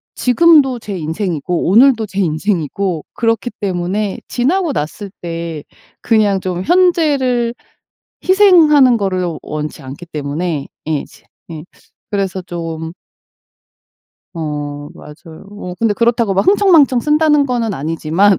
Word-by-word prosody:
지금도 270 -1 +4
제 205 -4 -6
인생이고 170 0 -2
오늘도 230 +2 +5
제 195 0 -5
인생이고 175 0 -1
그렇기 230 +1 -1
때문에 195 +1 -2
지나고 325 +7 0
났을 195 - -4
때 165 -3 -5 0.4
그냥 210 -4 +2
좀 185 -1 -3
현재를 290 - +2 0.8
희생하는 325 - +6
거를 190 -4 -1 0.2
원치 150 0 -6
않기 135 +6 -9
때문에 150 0 -3 0.2
예 155 -3 -1
지 - - -20 0.3
예 155 -2 -8 0.5
그래서 195 -2 -2
좀 165 -2 -6 1.4
어 145 -2 -5
맞아요. 160 +2 -13
어 195 -3 -8
근데 225 -2 +2
그렇다고 235 -1 +1
막 195 - 0
흥청망청 340 -10 +4
쓴다는 300 +1 +3
거는 235 -5 -1
아니지만 165 +6 +1
200 Hz, 260 characters per minute, -16 LUFS, 165-250 Hz, 1.4 s, 희생하는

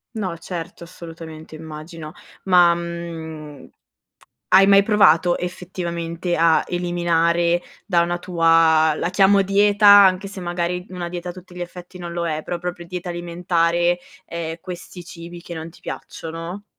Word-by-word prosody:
No 190 -6 -3
certo, 170 0 -7
assolutamente 165 -2 -10
immagino 155 0 -9 0.3
ma, 180 -2 +5
mhmm, 165 -3 -7 0.8
hai 190 +1 +6
mai 200 0 +6
provato 180 -5 +4
effettivamente 175 -1 -4
a 165 0 +4
eliminare 175 -1 +1 0.2
da 175 -4 +3
una 175 +1 -1
tua, 165 -2 +3
la 170 - -2
chiamo: 195 +2 +4
"dieta", 205 +2 +3
anche 195 -1 +7
se 195 0 -9
magari, 175 0 -3
mh, - - -13
una 175 -1 -4
dieta 180 0 -6
a - - -3
tutti 180 0 -14
gli 180 - -7
effetti 180 +1 -9
non 175 -1 -7
lo 170 0 -2
è, 155 0 -3
però 175 - -4
proprio 175 0 -5
dieta 180 +1 -6
alimentare, 175 0 0 0.3
ehm, 165 -1 -5
questi 180 0 -9
cibi 170 0 -10
che 170 - -8
non 160 +1 -7
ti - - -19
piacciono? 165 +5 -7
175 Hz, 150 wpm, -21 LUFS, 165-180 Hz, 0.8 s, anche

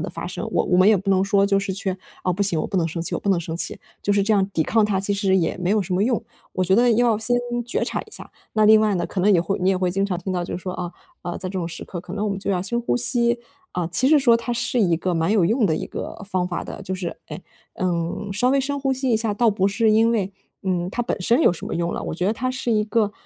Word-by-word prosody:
的 - - -3
发 - - -7
声， - - -5
我 - - +2
我 180 - +2
们 185 +2 +6
也 215 - +6
不 195 +1 -2
能 190 -1 +3
说 200 0 +3
就 200 0 +2
是 195 0 -2
去， 190 -1 -2 0.3
啊， 180 - +1
不 200 +3 0
行， 170 -5 +1
我 - - -3
不 200 - -3
能 170 -3 +2
生 165 +1 -4
气， - - -2
我 - - -5
不 - - -4
能 190 -3 +3
生 165 0 -5
气， - - -1 0.2
就 205 - 0
是 200 - +3
这 215 +3 +1
样 195 -2 +2
抵 165 -5 0
抗 220 +6 +2
它 200 -2 0
其 200 +1 0
实 195 -1 +2
也 170 0 0
没 180 0 -1
有 210 0 +2
什 180 - -5
么 190 +3 +2
用。 240 -2 0 0.3
我 185 - -1
觉 190 +2 +3
得 245 +2 +4
要 230 -1 +3
先 245 +2 +2 0.3
觉 - - -1
察 - - -2
一 - - -14
下。 - - -8 0.2
那 215 - +3
另 215 0 +7
外 215 -2 +2
呢， 175 - -1
可 190 - -3
能 205 +3 +4
也 175 - +4
会 175 +3 -2
你 185 - +2
也 195 - +3
会 185 -1 0
经 195 +2 0
常 185 -3 -2
听 185 +2 -4
到 180 -1 -1
就 - - -4
是 180 - -9
说 185 - -4
啊 175 -1 -5 0.3
啊， 175 - -4
在 185 - -5
这 190 - -4
种 170 - -2
时 165 -1 -7
刻 175 - -6
可 175 - -10
能 210 +1 -2
我 205 - 0
们 195 - -3
就 195 - -6
要 180 -1 0
深 235 +5 -2
呼 240 - 0
吸， 240 -1 +2 0.3
啊， 180 - -2
其 255 +10 +2
实 310 - +6
说 235 -4 +5
它 235 +1 -4
是 240 0 0
一 175 -5 +3
个 180 +2 -2
蛮 165 +3 +1
有 205 -5 +3
用 220 +4 +2
的 160 - +1
一 - - -3
个 - - -7
方 185 -2 -1
法 175 -1 -3
的， - - -8
就 190 - -4
是， 180 -2 -5
呃， - - -6 0.5
嗯， 175 +3 -2
稍 245 +6 +2
微 275 0 +3
深 285 +1 -2
呼 270 -1 0
吸 260 -1 -1
一 225 - +4
下。 220 -2 -1
倒 230 +2 +3
不 195 -2 +1
是 220 +2 +2
因 225 +2 +4
为， 200 -3 -1 0.3
嗯， 180 -2 -1
它 240 - -2
本 235 - -3
身 235 - +3
有 - - +5
什 175 - -7
么 - - -4
用 170 0 -1
了， - - -4
我 - - -4
觉 180 +2 -2
得 205 - +2
它 255 +3 -2
是 255 -1 -3
一 215 -2 +2
个， 210 -1 0
195 Hz, 345 characters per minute, -22 LUFS, 180-225 Hz, 0.5 s, 另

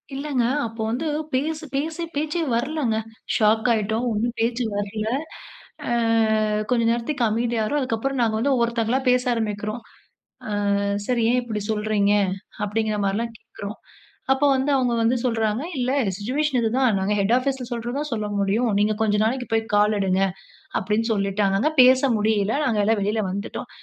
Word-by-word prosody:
இல்லங்க. 275 -3 -1 0.2
அப்போ 225 0 -8
வந்து 300 +7 -2 0.3
பேசு 310 +4 -1
பேசி 320 +4 -2
பேச்சே 310 +3 -1
வரலங்க. 260 -3 0 0.4
ஷாக் 220 +2 +3
ஆயிட்டோம். 220 +3 -1
ஒண்ணும் 235 +3 -1
பேச்சு 240 +2 0
வரல்ல. 210 +1 -3 0.8
ஆ - - -1 0.8
கொஞ்ச 235 -2 +2
நேரத்துக்கு 240 +2 -1
அமைதியாறோம். 230 +4 0
அதுக்கப்புறம் 255 +1 -2
நாங்க 220 -2 +1
வந்து 275 +3 +2
ஒவ்வொருத்தவங்களா 235 +1 +1
பேச 250 0 +3
ஆரம்பிக்கிறோம். 215 0 -3 0.7
ஆ - - -3 0.5
"சார், 245 -2 +1
ஏன் 250 - +3
இப்டி 220 -3 -4
சொல்றீங்க?" 210 -1 +1 0.5
அப்டிங்குற 215 +1 -1
மாரில்லாம் 225 +4 -1
கேக்குறோம். 205 +2 -9 0.5
அப்போ 270 +2 +3
வந்து 265 +2 0
அவுங்க 250 -2 +1
வந்து 230 +3 +3
சொல்றாங்க, 225 +1 0
"இல்ல 250 0 0 0.3
சிட்சுவேஷன் 260 +5 0
இது 225 -1 +1
தான். 255 -6 +3
நாங்க 200 +2 0
ஹெட் 200 +4 +2
ஆபீஸ்ல 260 -1 -2
சொல்றத 240 +1 -3
தான் 300 - -3
சொல்ல 215 -2 -2
முடியும். 215 +5 +1
நீங்க 210 +1 +2
கொஞ்ச 210 -1 +2
நாளைக்கு 245 +3 -1
போய் 225 0 +2
கால் 210 +1 +4
எடுங்க" 190 0 +1 0.6
அப்டின்னு 220 +4 -1
சொல்லிட்டாங்கங்க. 200 +5 +1
பேச 255 +1 +6 0.2
முடியல. 210 0 +1
நாங்க 220 -5 +1
எல்லாம் 220 -1 +2
வெளில 210 +2 0
வந்துட்டோம். 200 +3 -5
230 Hz, 150 wpm, -23 LUFS, 210-255 Hz, 0.8 s, பேச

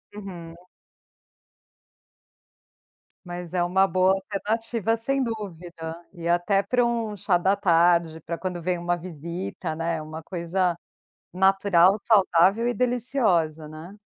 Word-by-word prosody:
Uhum. 175 -5 -9 2.7
Mas 175 -1 -7
é 180 -1 +1
uma 190 +2 +3
boa 185 +1 +3
alternativa, 220 +3 -2
sem 270 +4 -1
dúvida. 175 -7 -6 0.2
E 170 -3 -7
até 175 +3 +2
pra 250 +2 +1
um 230 -3 -2
chá 185 -2 +1
da 190 +3 +2
tarde, 170 -3 +3
pra 170 +2 -5
quando 180 -2 -4
vem 180 +1 -1
uma 175 0 -1
visita, 170 0 -6
né, 165 0 -2
uma 155 +1 -8
coisa 175 0 -1 0.6
natural, 190 -1 +4
saudável 195 +1 +4
e 245 - +1
deliciosa, 220 - 0
né. 160 +7 -11
180 Hz, 120 wpm, -25 LUFS, 170-205 Hz, 2.7 s, natural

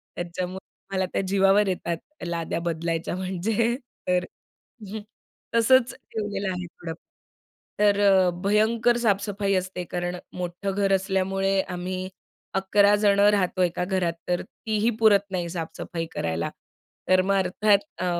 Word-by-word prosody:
त्याच्यामुळे 180 +2 -4 0.3
मला 190 -1 +1
त्या - - +1
जीवावर 195 +1 +4
येतात 170 -2 -2 0.3
लाद्या 170 -1 -2
बदलायच्या 165 0 -2
म्हणजे 200 +6 0 0.3
तर 180 0 +2 1.3
तसंच 250 +2 +4 0.2
ठेवलेलं 205 -2 -3
आहे 180 0 -4
थोडं. 165 -1 -8 0.9
तर 205 -1 +4
अ, 190 -3 +5
भयंकर 220 +4 +3
साफ-सफाई 200 -3 0
असते. 185 -1 -2
कारण 175 0 -3 0.2
मोठं 180 +2 -3
घर 195 0 +1
असल्यामुळे 195 0 +1
आम्ही 185 0 -4 0.5
अकरा 200 +1 +4
जणं 205 -1 +4
राहतो 185 -2 +1
एका 175 0 0
घरात. 180 -3 0
तर 175 0 0
तीही 220 0 -1
पुरत 205 -3 +4
नाही 175 -2 -2
साफ-सफाई 165 0 -5
करायला. 80 +1 -2 0.6
तर 185 0 +6
मग 195 +2 +1
अर्थात 195 +2 +3 0.2
अ, - - 0
190 Hz, 125 wpm, -25 LUFS, 180-205 Hz, 1.3 s, तर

